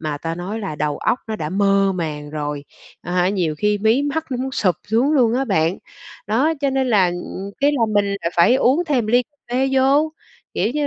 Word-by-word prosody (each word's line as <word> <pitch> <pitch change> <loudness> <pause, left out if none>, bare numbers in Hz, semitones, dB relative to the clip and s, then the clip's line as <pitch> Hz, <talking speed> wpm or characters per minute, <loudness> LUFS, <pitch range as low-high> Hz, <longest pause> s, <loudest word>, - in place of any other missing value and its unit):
mà 150 -2 -3
ta 165 +1 -4
nói 185 +6 -5
là 195 -8 -5
đầu 150 -1 -2
óc 250 - 0
nó 220 -1 -3
đã 150 - -4
mơ 195 0 +2
màng 150 -4 -4
rồi, 145 -1 -4 0.4
à 175 - -6
hả, 180 0 +2
nhiều 180 -6 -1
khi 210 +2 +1
mí 220 +6 +2
mắt 300 +3 -2
nó 250 - -1
muốn 265 +1 -4
sụp 185 - +1
xuống 240 +8 +2
luôn 240 -5 +3
á 265 +2 +1
bạn. 180 -6 0 0.5
Đó, 255 +10 +2
cho 280 -1 +1
nên 265 -1 0
là, 200 -6 +4
ừm, 175 +2 -5
cái 285 +1 +4
là 270 -5 0
mình 205 -1 +3
lại 200 -4 -2
phải 175 +8 +5
uống 270 +6 +2
thêm 250 -7 +1
ly 245 +3 +3
cà 290 +3 -38 0.2
phê 265 +1 +2
vô. 275 +4 +3 0.4
Kiểu 220 - 0
như 295 -1 0
210 Hz, 230 wpm, -20 LUFS, 175-265 Hz, 0.5 s, phải